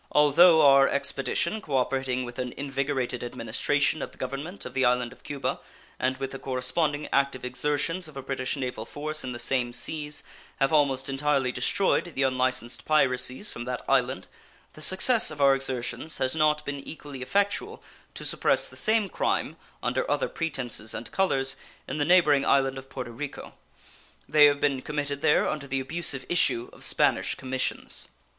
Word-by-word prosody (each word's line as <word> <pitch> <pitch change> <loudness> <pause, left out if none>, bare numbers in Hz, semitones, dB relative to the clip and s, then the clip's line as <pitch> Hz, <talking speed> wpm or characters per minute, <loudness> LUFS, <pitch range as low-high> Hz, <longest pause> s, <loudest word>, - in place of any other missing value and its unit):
Although 160 +3 +6
our 135 0 +7
expedition, 140 +8 -1
cooperating 130 -4 -1
with 120 0 -9
an 125 -1 -3
invigorated 135 -3 -2
administration 135 +6 0
of - - -5
the - - -17
government 140 +9 -6
of - - -8
the 130 - +1
island 125 0 +1
of - - -22
Cuba, 145 -2 -3 0.4
and 130 +1 0
with 135 0 -4
the 135 - -7
corresponding 140 +4 -1
active 140 -2 +1
exertions 150 +7 -1
of 150 -3 -12
a 135 - -6
British 130 0 -2
naval 125 -4 -4
force 150 +6 +1
in 130 - -4
the 120 - -6
same 125 -1 +1
seas, 150 +3 -2 0.4
have 135 +2 +2
almost 135 -3 +2
entirely 135 -1 0
destroyed 175 +6 0
the 135 - +1
unlicensed 130 -2 0
piracies 130 +3 +2
from 120 - -7
that 125 0 -5
island, 130 -7 +1 0.5
the 155 - -13
success 200 +8 +5
of 155 - -6
our 140 -1 +6
exertions 135 +3 -3
has 130 +3 0
not 150 -1 +2
been 140 0 -4
equally 145 -2 -9
effectual 200 - -1 0.3
to - - -5
suppress - - +2
the - - -13
same 220 -1 +1
crime, 160 - -1 0.3
under 125 +1 -1
other 145 -1 +1
pretenses 125 -9 -3
and 115 - -7
colors, 135 -8 +1 0.3
in - - -4
the 145 - +1
neighboring 155 -5 +4
island 135 -1 +2
of 135 0 -14
Porto 125 -3 -6
Rico. 140 +5 -7 0.7
They 150 -1 +6
have 145 -1 +3
been 140 -3 0
committed 145 -1 -3
there 150 - +3
under 140 -2 -3
the 135 0 -1
abusive 135 -1 -1
issue 125 -8 +2
of - - -12
Spanish - - +1
commissions. 130 -1 -3
135 Hz, 170 wpm, -26 LUFS, 130-150 Hz, 0.7 s, our